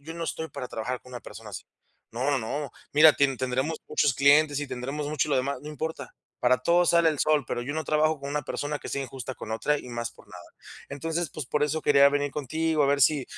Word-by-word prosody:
yo 165 +2 -8
no 170 0 -4
estoy 160 0 -4
para 125 -3 -7
trabajar 125 +3 -4
con 125 - -15
una 120 - -6
persona 110 -1 -11
así. 95 - -7 0.5
No, 130 +5 0
no, 140 - +2
no. 140 +4 -4 0.2
Mira, 150 +1 +8
tin 135 -2 +1
tendremos 130 +5 -1
muchos 140 - +2
clientes, 145 +2 +4
y 145 - -3
tendremos 135 +4 -4
mucho 150 0 0
lo 145 - +2
demás, 130 +1 -1
no 150 - -9
importa. 160 +2 -5 0.3
Para 125 +1 +3
todo 175 +1 +3
sale 170 -1 +4
el 150 -3 -1
sol, 155 -2 +2
pero 120 - -3
yo 140 - -4
no 155 0 -3
trabajo 155 0 +2
con 140 0 -7
una 150 +1 -2
persona 145 +1 -4
que - - -8
sea 140 - -2
injusta 130 -1 -6
con 110 - -6
otra, 150 +6 0
y - - -10
más 120 -1 -4
por - - -19
nada. - - -11 0.5
Entonces, 160 +3 -3
pues, 150 -5 -6
por 150 +2 0
eso 155 +2 0
quería 140 -1 +6
venir 145 0 -1
contigo, 155 +2 0
a - - +3
ver 140 0 +2
si 140 -1 +4
145 Hz, 245 wpm, -27 LUFS, 130-155 Hz, 0.5 s, Mira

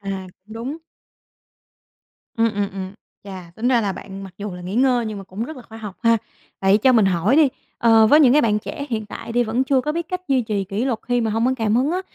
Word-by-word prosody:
À, 195 -2 -5
cũng 205 +4 -18
đúng. 250 +7 -5 1.6
Ừm, 230 -1 +2
ừm, 200 -1 -1
ừm, 190 0 -6 0.3
chà, 185 -3 -9
tính 240 +3 0
ra 245 -3 +4
là 200 -3 -1
bạn 195 +1 -9
mặc 185 -2 -12
dù 205 -1 -5
là 180 - -8
nghỉ 185 +3 -5
ngơi 250 -2 +2
nhưng 215 -2 -5
mà 195 - -9
cũng 195 +5 -5
rất 315 +2 -8
là 250 - -10
khoa 225 -1 -12
học 210 -4 -8
ha. 230 -1 +4 0.4
Vậy 195 +2 +4
cho 260 +4 +4
mình 220 -4 +5
hỏi 190 - +2
đi, 305 -3 +6 0.3
ờ, 225 -1 +5
với 300 +7 +6
những 255 -4 +6
cái 300 - +5
bạn 210 -2 +2
trẻ 280 +6 -6
hiện 220 -2 -2
tại 230 - -8
đi 245 0 +3
vẫn 230 +4 0
chưa 265 -1 +2
có 300 +3 -2
biết 335 0 -4
cách 365 0 -3
duy 260 -3 +2
trì 210 -3 -2
kỷ 200 +6 -3
luật 240 -5 -1
khi 245 0 +2
mà 220 -1 0
hông 225 +3 +1
có 260 - +2
cảm 220 -1 +1
hứng 265 +5 +2
á, 365 - -1
225 Hz, 265 wpm, -21 LUFS, 200-255 Hz, 1.6 s, đi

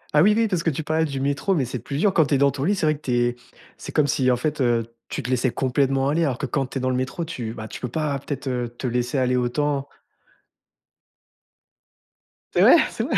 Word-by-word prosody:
Ah 150 - +7
oui 210 +3 +5
oui, 225 -1 +3
parce 180 -5 -1
que 165 - +1
tu 155 +1 -3
parlais 160 +1 +1
du 140 -3 -4
métro, 140 +8 0
mais 135 -5 +1
c'est 125 0 -5
plus 140 +5 -5
dur 195 +3 +2
quand 160 -4 +4
tu 145 - +2
es - - +3
dans 140 0 +4
ton 135 - -4
lit. 205 +2 +2
C'est 180 - -1
vrai 155 0 +3
que 145 - -14
tu 125 - -3
es 120 0 +1 0.4
c'est - - -8
comme 150 - +3
si, 130 -2 +1
en 125 - +4
fait, 150 +2 -2 0.5
tu - - -4
te 125 - -5
laissais 130 0 +1
complètement 135 +1 +1
aller, 165 +4 +1
alors 130 -5 0
que, 140 - -3
quand 135 +1 -1
tu 135 - -6
es - - -2
dans 130 0 0
le - - 0
métro, 135 +7 -2
tu 115 -8 -5
bah, 110 -1 -7
tu - - -8
peux 125 - -2
pas, 145 +1 -2
peut-être, 140 0 -5
te 125 -3 -2
te 120 +3 -9
laisser 125 +2 -1
aller 125 -1 +2
autant. 140 +3 0 2.7
Cest - - +3
vrai? - - +8
C'est - - -3
vrai? - - 0
135 Hz, 260 wpm, -23 LUFS, 125-150 Hz, 2.7 s, vrai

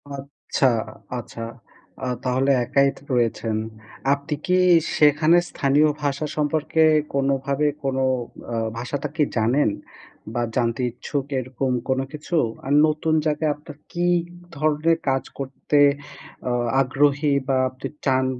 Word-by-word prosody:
আচ্ছা, 135 0 -1 0.5
আচ্ছা 115 0 -9 0.6
আ - - -2 0.2
তাহলে 130 +2 +2
একাই 140 +3 +3
থ - - -12
রয়েছেন। 115 -2 0 0.6
আপনি 140 +2 -3
কি 180 0 +3 0.4
সেখানে 155 +3 +5
স্থানীয় 145 +2 +3
ভাষা 140 +2 -1
সম্পর্কে 155 +1 0 0.3
কোনোভাবে 140 +1 +1 0.2
কোনো 135 -1 0 0.5
আ - - -1 0.2
ভাষাটা 140 +4 -3
কি 155 - +3
জানেন 120 +3 +3 0.6
বা 120 - -1
জানতে 120 0 0
ইচ্ছুক, 135 +3 -4
এরকম 130 +1 -2 0.2
কোনো 130 0 +1
কিছু? 155 +3 -4 0.3
আর 140 - 0
নতুন 155 +1 0
জায়গায় 150 0 +1
আপনার 150 0 -12 0.2
কি 175 0 0 0.5
ধরনের 155 +3 +2
কাজ 135 0 +1 0.2
করতে 135 +2 -1 0.7
আ - - 0 0.3
আগ্রহী 140 +2 +2
বা 135 -1 +2
আপনি 130 +1 -7 0.2
চান 130 -1 +3
140 Hz, 125 wpm, -23 LUFS, 130-150 Hz, 0.7 s, সেখানে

